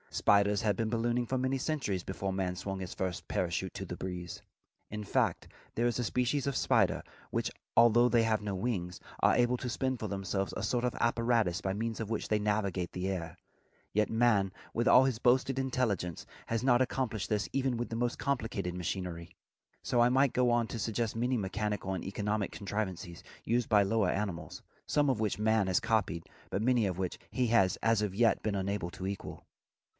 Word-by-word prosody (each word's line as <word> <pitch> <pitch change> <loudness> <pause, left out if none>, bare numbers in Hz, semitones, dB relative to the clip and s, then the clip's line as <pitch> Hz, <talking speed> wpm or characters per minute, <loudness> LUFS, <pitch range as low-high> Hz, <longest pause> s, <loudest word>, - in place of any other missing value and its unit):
Spiders 100 +2 +3
had 105 -3 +2
been 110 +2 -1
ballooning 120 +1 0
for 130 - 0
many 130 +1 0
centuries 125 - -1
before 95 0 -3
man 95 -1 -1
swung 95 +1 -4
his 95 0 -5
first 95 -2 -3
parachute 90 +1 -1
to - - -4
the - - -5
breeze. 90 -2 -6 0.5
In 105 0 -5
fact, - - 0 0.3
there 120 - +1
is 120 0 +1
a - - +1
species 125 +5 0
of 140 - -1
spider, - - +2 0.3
which, - - -1 0.3
although 120 +1 +6
they 120 -2 +4
have 110 -1 +1
no 105 -1 -3
wings, 95 -5 -2 0.2
are - - +5
able 120 +1 +3
to 125 - -4
spin 130 +1 -1
for 110 - -4
themselves 95 -1 -2
a - - -3
sort 120 -1 0
of 125 - 0
apparatus 115 -6 +2
by 95 -1 -1
means 115 +2 -3
of 110 -2 -4
which 110 - -2
they 105 - +1
navigate 100 -4 -1
the 90 +1 -3
air; 85 -4 -4 0.6
yet 105 0 +2
man, 110 -4 +3 0.2
with 120 +1 0
all 130 - +7
his 130 -4 0
boasted 130 +2 +3
intelligence, 115 - -1 0.2
has 115 0 -1
not 125 -1 +4
accomplished 125 -5 -1
this, 105 -1 0
even 135 -3 0
with 120 - -3
the 115 - -4
most 120 +1 -1
complicated 110 -9 -2
machinery. 90 -1 -4 0.5
So 120 - +2
I 120 - +5
might 135 +1 +3
go 125 -1 +3
on 120 -1 +3
to 115 - -4
suggest 115 +1 -1
many 125 +2 +1
mechanical 105 -1 -2
and 95 - -4
economic 105 +1 -2
contrivances 95 -4 -4 0.2
used 120 0 +1
by 105 -3 +5
lower 100 -1 +2
animals, 95 -4 -3 0.3
some 145 -1 +2
of 130 -5 +1
which 105 -1 -1
man 110 -2 +2
has 95 -1 +3
copied 95 -7 0 0.3
but 100 - -1
many 120 -2 +3
of 90 -2 -3
which 95 -2 -3
he 125 +5 0
has 110 -5 +3
as 115 -1 +2
yet 105 +3 +2
been 105 -2 0
unable 100 -2 -2
to 95 - -7
equal. 100 0 -6
110 Hz, 200 wpm, -31 LUFS, 95-120 Hz, 0.6 s, all